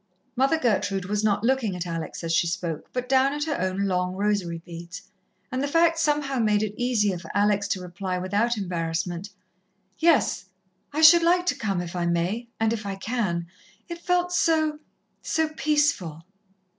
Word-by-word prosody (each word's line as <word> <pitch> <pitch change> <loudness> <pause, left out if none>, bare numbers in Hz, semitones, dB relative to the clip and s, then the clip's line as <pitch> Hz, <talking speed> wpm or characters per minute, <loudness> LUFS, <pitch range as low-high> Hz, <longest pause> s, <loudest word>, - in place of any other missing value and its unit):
Mother 270 +5 +3
Gertrude 200 - 0
was 205 +2 -1
not 210 -1 +1
looking 240 -6 +1
at 180 0 -4
Alex 165 0 -5
as 165 0 -1
she 170 - +3
spoke, 165 -2 -4
but 250 0 -3
down 265 +1 +3
at 295 0 -2
her 300 - -2
own 185 +1 -1
long 180 -1 -1
rosary 195 -4 0
beads; 170 +2 -9 0.5
and 255 +1 -1
the 285 - 0
fact 330 +2 +3
somehow 295 -4 +1
made 210 -2 +2
it 210 -1 -3
easier 215 -6 +1
for 170 -1 -11
Alex 205 -1 +2
to 190 - -2
reply 180 +1 -4
without 205 +6 0
embarrassment. 175 0 -3 0.7
"Yes, 325 - +3 0.5
I 305 +2 -1
should 335 +2 +9
like 355 +2 +3
to - - +1
come 195 -5 -2
if 175 0 -7
I 175 -1 -1
may 175 +8 -1
and 225 0 +2
if 220 -2 -4
I 200 -1 -4
can. 195 -5 -2 0.4
It 340 0 -6
felt 355 0 +1
so 315 -3 +2 0.4
so 320 -1 0
peaceful." 285 - 0
210 Hz, 175 wpm, -25 LUFS, 180-280 Hz, 0.7 s, should